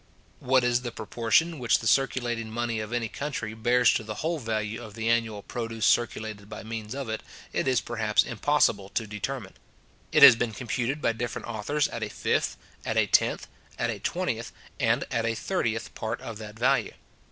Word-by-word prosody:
What 130 0 +3
is 120 0 +2
the 120 -1 -4
proportion 130 +9 +1
which 120 -2 +3
the - - -8
circulating 120 -2 +1
money 115 0 -2
of 110 +1 -5
any 120 -1 -1
country 130 -4 -4
bears 120 +2 +4
to - - -1
the 105 0 -6
whole 165 0 0
value 110 -2 -2
of 110 -3 -10
the 115 0 -3
annual 115 -3 +1
produce 115 -3 -3
circulated 110 -3 0
by 105 - -7
means 110 +1 -5
of 140 -3 -4
it, 110 0 -3 0.3
it - - 0
is 130 -3 +3
perhaps 110 -2 +1
impossible 120 -5 +1
to 115 - 0
determine. 105 0 -5 0.6
It - - +6
has 135 -4 +12
been 115 -1 -1
computed 125 +5 -2
by 115 - +3
different 120 +1 -4
authors 120 +7 0
at 115 - -6
a 105 - -2
fifth, - - 0 0.3
at - - -2
a - - +5
tenth, - - +2 0.3
at - - 0
a - - -5
twentieth, - - -2 0.3
and - - +2
at 115 - 0
a 115 0 0
thirtieth, 115 - -2
part 110 +2 -3
of 110 -2 -7
that 105 0 -9
value. 130 +4 +2
115 Hz, 190 wpm, -27 LUFS, 110-125 Hz, 0.6 s, has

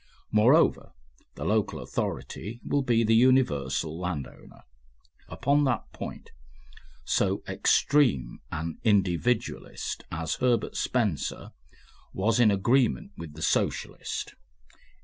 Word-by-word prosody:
Moreover, 120 +10 +4 0.4
the - - -6
local - - 0
authority 110 +6 -4
will 145 - +1
be 120 -3 +2
the 110 0 +3
universal 85 - +2
landowner. 90 -7 -6 0.7
Upon 145 +2 +1
that 125 -4 -2
point - - -8 0.7
so 100 +1 +1
extreme 95 - +2
an 80 +1 -4
individualist 105 +2 0
as 80 0 -3
Herbert 125 -2 +1
Spencer 110 - -1 0.6
was 110 +5 +1
in 115 -3 +6
agreement 110 - +2
with 80 -3 -9
the 80 - -6
Socialist. - - -2
105 Hz, 100 wpm, -27 LUFS, 85-125 Hz, 0.7 s, in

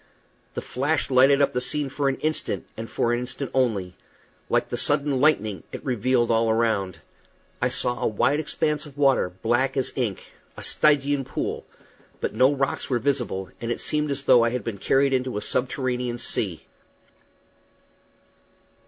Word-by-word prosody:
The - - -4
flash 140 +2 -1
lighted 135 +2 +5
up - - +1
the 125 - 0
scene 145 +3 -1
for 140 +1 0
an 135 - -1
instant, 155 0 -2
and 115 +1 -7
for 120 - 0
an 120 - 0
instant 125 +2 -5
only; 110 -9 0 0.6
like - - +1
the - - -2
sudden 145 -2 +1
lightning, 110 - +2
it - - -8
revealed 125 -1 +1
all 115 0 +2
around. 110 -6 0 0.6
I - - +2
saw 120 0 -1
a - - +2
wide 135 +7 +1
expanse 150 -1 -1
of 145 -1 -15
water, 135 -9 +3
black 120 +4 +1
as 130 - 0
ink 115 -8 -2 0.3
a - - -6
Stygian 145 -2 +3
pool; - - -4 0.5
but - - -2
no 130 +2 +4
rocks 135 -1 -1
were 125 - +2
visible, 120 -8 -2
and 115 0 -2
it - - -2
seemed 150 0 -1
as 140 0 -3
though 120 -4 +6
I 115 - +3
had 125 -1 -3
been 105 -3 -5
carried 135 +4 +2
into 130 -3 -1
a - - -2
subterranean 125 0 -1
sea. 95 - -2
130 Hz, 170 wpm, -24 LUFS, 115-140 Hz, 0.6 s, though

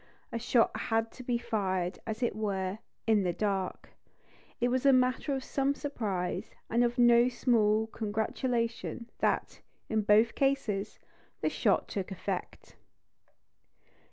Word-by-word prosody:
A 230 - -2
shot 240 0 +2
had 225 -1 0
to - - -11
be 245 -1 0
fired, 195 -6 -1
as 220 +2 -3
it 235 - 0
were, 200 -2 -2 0.3
in 220 -2 +4
the 180 -2 0
dark. 195 -1 -2 0.7
It 245 - +2
was 255 0 0
a 275 - +6
matter 255 +2 +2
of 265 - -4
some 275 +1 0
surprise, 205 -12 -3 0.2
and 235 +2 +3
of 240 +1 0
no 240 0 +6
small 220 -3 +2
congratulation, 230 +2 -2
that, - - 0 0.3
in 220 -1 +1
both 210 +2 +4
cases, 225 -7 0 0.4
the - - +2
shot - - +1
took 195 -1 -4
effect. 190 - -5
225 Hz, 135 wpm, -30 LUFS, 205-245 Hz, 0.7 s, a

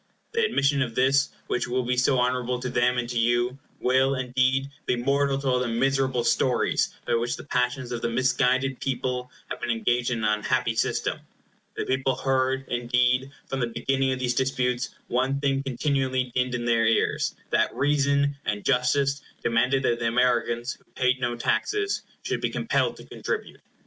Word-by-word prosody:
The 460 +1 +1
admission 140 - +2
of 120 -4 -2
this, 135 +2 +3 0.2
which 120 - -1
will 125 +1 0
be 125 +1 0
so 125 +2 +3
honorable 125 0 0
to 125 - -3
them 125 +1 +2
and 120 -1 -1
to 120 -1 -1
you, 120 +3 +1 0.2
will, 130 +2 +3
indeed, 130 +1 +1 0.2
be - - +2
mortal 140 +2 +1
to 140 0 -4
all 125 -1 +3
the 125 - -1
miserable 130 +1 +1
stories 120 +1 +1
by 120 - 0
which 120 +1 0
the - - -9
passions 125 -1 -1
of 120 -1 -3
the 120 - 0
misguided 130 +2 +1
people 125 -1 -2 0.2
have - - -5
been 120 - -3
engaged 120 +1 +1
in 115 -3 -2
an 105 0 +2
unhappy 115 +1 0
system. - - 0 0.6
The - - -3
people 130 0 0
heard, 130 0 0
indeed, 125 +2 +1 0.2
from 135 - -4
the 120 - 0
beginning 135 +3 0
of 130 - -1
these 125 -1 0
disputes, 125 -1 0 0.2
one 130 +3 0
thing 135 -1 +1
continually 130 -1 -1
dinned 125 -1 0
in 120 -1 -3
their 115 -1 +3
ears, 115 - +1 0.2
that - - +2
reason 140 0 +2
and 105 -1 -3
justice 135 +2 +2 0.2
demanded 125 +4 +2
that 120 -2 +1
the 115 - 0
Americans, 120 0 +1
who - - -28
paid 125 0 +2
no 120 -1 0
taxes, 410 - 0 0.2
should - - -2
be - - 0
compelled - - 0
to - - -12
contribute. 440 -2 -5
125 Hz, 180 wpm, -26 LUFS, 120-135 Hz, 0.6 s, this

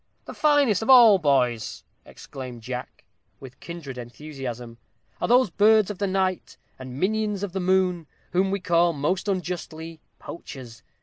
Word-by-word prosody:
"The - - -8
finest 290 - +3
of 220 - -4
all 235 -6 +8
boys," 125 -7 0 0.2
exclaimed 125 -4 -10
Jack, 125 +1 -7 0.4
with 130 -2 -11
a - - -35
kindred 155 -7 -8
enthusiasm, 125 -2 -8 0.4
"are - - 0
those 245 -4 +4
birds 215 +1 +4
of 195 - -9
the 200 - 0
night, 190 -1 -2 0.2
and 130 0 -8
minions 210 +1 -1
of 200 - -3
the 190 - -3
moon, 180 -3 +1 0.2
whom 185 +2 +1
we 200 +1 -1
call, 175 -1 +2
most 165 +8 -2
unjustly, 165 -4 -4 0.2
poachers. 125 -8 -10
175 Hz, 150 wpm, -24 LUFS, 135-195 Hz, 0.4 s, all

